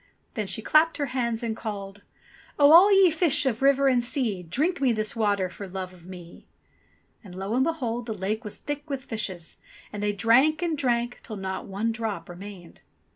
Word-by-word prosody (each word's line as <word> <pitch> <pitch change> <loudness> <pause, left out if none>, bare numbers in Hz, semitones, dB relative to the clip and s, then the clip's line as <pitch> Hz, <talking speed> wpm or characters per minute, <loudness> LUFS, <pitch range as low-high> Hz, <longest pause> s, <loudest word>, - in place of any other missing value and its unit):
Then 215 -4 -3
she 190 +3 -3
clapped 315 +6 +3
her 290 - -1
hands 235 -2 -1
and 225 -1 -2
called: 205 -3 -7 0.6
"Oh! 290 0 +6
all 375 +5 +8
ye 390 -3 +6
fish 315 -3 +2
of 240 -3 -1
river 275 0 +4
and 250 -2 +3
sea, 240 -7 -1
Drink 285 - -1
me 260 -3 +3
this 215 0 -2
water 205 -4 +1
for 195 +2 -9
love 185 0 -6
of 175 -1 -17
me 175 -2 -12 0.8
I" - - -13
And 180 - -11
lo 195 +3 -4
and 255 +2 +3
behold! 245 -7 -2
the 220 - -2
lake 210 +4 -3
was 210 - -6
thick 290 +1 -6
with 275 -2 -4
fishes. 190 -7 -4 0.4
And 205 - -5
they 210 0 +1
drank 250 - +3
and 335 -2 0
drank, 245 -4 -1
till 215 - -8
not 190 -1 -5
one 205 +4 -2
drop 225 -4 -4
remained. 180 -1 -11
225 Hz, 200 wpm, -26 LUFS, 195-275 Hz, 0.8 s, all